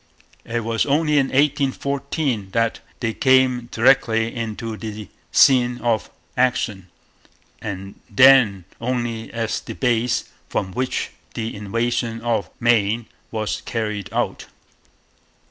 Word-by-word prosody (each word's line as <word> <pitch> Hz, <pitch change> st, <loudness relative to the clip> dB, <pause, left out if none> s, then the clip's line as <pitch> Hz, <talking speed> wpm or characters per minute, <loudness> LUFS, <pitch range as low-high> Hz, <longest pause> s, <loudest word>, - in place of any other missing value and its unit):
It 115 Hz, 0 st, -2 dB
was 115 Hz, +2 st, 0 dB
only 150 Hz, +1 st, +3 dB
in 135 Hz, -, +2 dB
1814 140 Hz, -4 st, 0 dB
that 115 Hz, -1 st, +1 dB, 0.2 s
they 115 Hz, -2 st, 0 dB
came 130 Hz, -2 st, +3 dB
directly 115 Hz, -2 st, +3 dB
into 115 Hz, -1 st, -4 dB
the 105 Hz, -2 st, -7 dB, 0.2 s
scene 125 Hz, -2 st, +5 dB
of 115 Hz, -3 st, 0 dB, 0.3 s
action, 120 Hz, -7 st, 0 dB, 0.7 s
and 95 Hz, -1 st, -6 dB
then 115 Hz, -5 st, +6 dB, 0.2 s
only 120 Hz, -2 st, -2 dB
as 115 Hz, -2 st, -2 dB
the -, -, -8 dB
base 120 Hz, -1 st, +1 dB, 0.3 s
from 95 Hz, -, -2 dB
which 130 Hz, +6 st, -2 dB, 0.2 s
the 115 Hz, 0 st, -3 dB
invasion 115 Hz, +3 st, -1 dB
of 115 Hz, -3 st, -1 dB
Maine 115 Hz, -1 st, +2 dB, 0.2 s
was 110 Hz, -1 st, -3 dB
carried 105 Hz, -4 st, -3 dB
out. -, -, -2 dB
115 Hz, 110 wpm, -22 LUFS, 110-130 Hz, 0.7 s, then